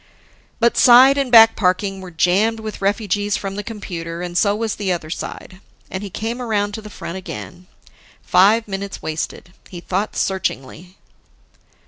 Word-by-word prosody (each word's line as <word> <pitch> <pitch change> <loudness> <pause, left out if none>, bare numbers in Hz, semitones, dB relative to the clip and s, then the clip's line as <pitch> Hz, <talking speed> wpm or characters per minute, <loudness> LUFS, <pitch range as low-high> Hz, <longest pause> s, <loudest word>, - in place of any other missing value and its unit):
But 235 0 +2
side 255 +3 +7
and 275 -3 -1
back 225 -1 +8
parking 195 0 0
were 185 - -9
jammed 190 +7 +1
with 215 -2 -7
refugees 205 0 0
from 195 -1 -5
the 205 - -3
computer, 175 -6 -6
and 175 -1 -6
so 200 +2 +2
was 220 0 -2
the 200 -3 -2
other 160 -3 -4
side. 185 +2 -7 0.3
And 190 - -4
he 205 - -6
came 225 +6 -4
around 205 -4 -1
to 220 - -6
the 210 - -10
front 185 -2 -7
again. 180 -1 -9 0.6
Five 210 +5 +4
minutes 195 0 -6
wasted. 160 +3 -5 0.2
He 175 - -8
thought 190 +4 -3
searchingly. 180 -1 -3
200 Hz, 160 wpm, -19 LUFS, 180-220 Hz, 0.6 s, back